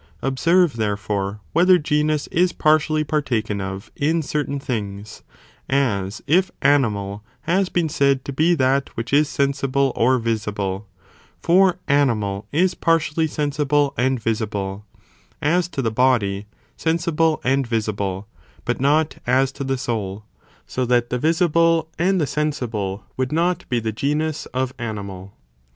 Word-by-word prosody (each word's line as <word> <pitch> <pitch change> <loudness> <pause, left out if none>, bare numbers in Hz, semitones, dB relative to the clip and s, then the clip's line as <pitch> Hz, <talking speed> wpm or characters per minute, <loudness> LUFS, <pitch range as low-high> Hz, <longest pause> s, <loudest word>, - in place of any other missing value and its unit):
""" - - -32
Observe, 165 +3 +2
therefore, 105 -1 -2
whether 180 +2 +6
genus 150 -1 0
is 175 +1 +2
partially 155 0 +2
partaken 120 -9 -1
of 95 +2 -6
in 160 +3 +1
certain 140 -1 -2
things, 105 -5 -5 0.5
as 105 -8 0
if 180 +6 +3
animal 105 -8 +1 0.2
has 180 +4 +1
been 175 -2 0
said 140 -2 +1
to 140 - -4
be 160 +5 +3
that 135 -1 +1
which 115 +3 -4
is 145 0 +4
sensible 140 -1 0
or 130 +3 +3
visible, 105 -4 -2 0.5
for 180 +1 +4
animal 110 -8 +1
is 180 +5 +2
partially 160 -1 +1
sensible 145 -1 0
and 130 +1 +1
visible; 105 -3 -3 0.5
as 170 +4 +1
to 140 -6 -4
the 115 - 0
body, 110 -5 +1 0.3
sensible 165 -1 +1
and 135 0 +1
visible, 100 -4 -2 0.4
but 120 +1 -1
not 150 +3 +2
as 130 +2 +3
to 140 - -6
the 135 0 -1
soul; 105 -4 -4 0.4
so 130 - -2
that 120 -1 +1
the 125 - 0
visible 165 +1 +2
and 185 +2 +2
the 155 - +2
sensible 115 -11 -2
would 130 0 -1
not 170 +3 0
be 120 - +1
the 110 -1 -2
genus 150 +6 -2
of 130 0 -2
animal. 100 -4 -6
135 Hz, 140 wpm, -21 LUFS, 110-155 Hz, 0.5 s, whether